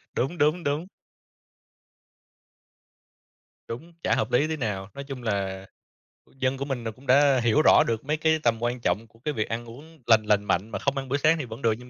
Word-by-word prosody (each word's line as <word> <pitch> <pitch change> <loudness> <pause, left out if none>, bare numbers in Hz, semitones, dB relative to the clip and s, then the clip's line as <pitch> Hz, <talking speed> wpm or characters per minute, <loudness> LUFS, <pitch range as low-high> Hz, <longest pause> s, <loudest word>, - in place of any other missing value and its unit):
đúng, 150 +8 -1
đúng, 155 +4 +2
đúng. 150 +5 -1 2.8
Đúng, 160 +9 -8
chả - - +2
hợp - - -1
lý 145 +5 +3
tí 160 0 -3
nào. 105 -6 -3
Nói 140 - -7
chung 135 -3 -8
là, 95 -3 -2 0.6
ừ, - - -26
dân 130 0 0
của 140 - -3
mình 130 -4 -3
là 115 - -3
cũng 130 +6 -18
đã 135 0 +5
hiểu 120 +6 +4
rõ - - +6
được 115 +2 -2
mấy 150 +1 0
cái 160 0 +2
tầm 115 0 +1
quan 120 +1 -1
trọng 105 +5 -1
của 115 - -24
cái 150 +4 -3
việc 110 -2 -2
ăn 115 +1 -3
uống 150 +7 -13
lành 110 -2 +5
lành 105 -1 +2
mạnh 100 +4 0
mà - - -4
không 140 0 -1
ăn 135 -1 -4
bữa 140 - +1
sáng 155 +3 +3
thì 145 - -4
vẫn 115 +3 -9
được, 115 - +3
nhưng 125 0 -13
125 Hz, 220 wpm, -26 LUFS, 115-145 Hz, 2.8 s, rõ